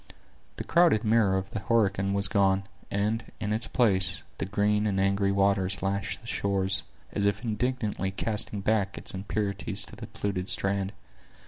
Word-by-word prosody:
The - - -5
crowded 170 -10 +4
mirror 110 -4 +3
of 95 0 -4
the 110 - -3
Horican 100 -3 +1
was 100 -1 +3
gone; 100 -2 +2 0.3
and, 105 +3 0 0.2
in 105 -1 -1
its 110 +3 0
place, 95 -6 +2 0.2
the - - -2
green 105 +1 +1
and 95 -2 0
angry 100 0 +2
waters 95 -1 +1
lashed 100 0 -2
the - - -13
shores, 95 -1 +2 0.3
as 100 - +1
if 100 +2 -1
indignantly 110 -3 -1
casting 105 +1 -2
back 100 -1 0
its - - -2
impurities 100 +1 -3
to - - -11
the - - -8
polluted 95 -2 -3
strand. 100 0 0
100 Hz, 160 wpm, -28 LUFS, 95-105 Hz, 0.3 s, crowded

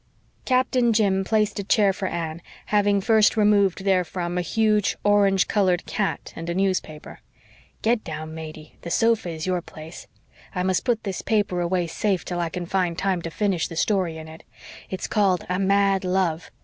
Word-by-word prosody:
Captain 255 -2 +2
Jim 195 -3 +2
placed 210 0 0
a - - -2
chair 200 0 +3
for 190 0 -3
Anne, 165 -1 -4 0.3
having 205 -1 +3
first 220 +2 +3
removed 200 -3 +3
therefrom 180 -2 0
a 180 - +1
huge, 210 +3 +1
orange 200 -2 +3
colored 185 -4 +1
cat 210 -4 -3
and 165 +1 -6
a 170 - -2
newspaper. 185 -5 -2 0.6
"Get 225 0 +2
down, 155 -1 -6
Matey. 155 -1 -9
The 170 - -7
sofa 225 -1 +2
is 160 -1 -5
your 180 -1 0
place. 160 -1 -11 0.5
I 180 - 0
must 185 -1 0
put 240 -3 0
this 195 -3 -4
paper 205 -5 0
away 175 0 0
safe 190 +3 -1
till 175 -1 -3
I 170 -1 -1
can 180 +1 -5
find 180 -2 -1
time 190 -3 0
to 165 - -5
finish 190 -2 -1
the 165 - -9
story 180 -2 0
in 160 0 -9
it. 160 +1 -12 0.5
It's 190 - -4
called 195 -4 +1
A 180 +1 -1
Mad 195 0 +2
Love. 180 -3 -1
190 Hz, 180 wpm, -24 LUFS, 170-205 Hz, 0.6 s, chair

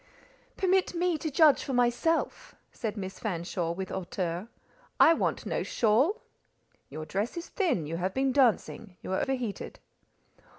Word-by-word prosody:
"Permit 375 -1 +2
me 350 0 +1
to 315 - -2
judge 300 0 +5
for 270 - -4
myself," 245 +7 0 0.2
said 220 -2 -4
Miss 190 -1 -6
Fanshawe, 175 -4 -2
with 190 +1 -5
hauteur. 180 0 -3 0.5
"I 330 - +8
want - - -1
no - - -1
shawl." 250 - +2 0.7
"Your 155 0 -6
dress 205 - -2
is 340 - -6
thin, 325 - 0
you 165 +3 -4
have 185 +2 -2
been 265 0 +2
dancing, 230 -6 +1
you 190 - -3
are - - +1
heated." 245 -6 -4
230 Hz, 145 wpm, -29 LUFS, 190-310 Hz, 0.7 s, I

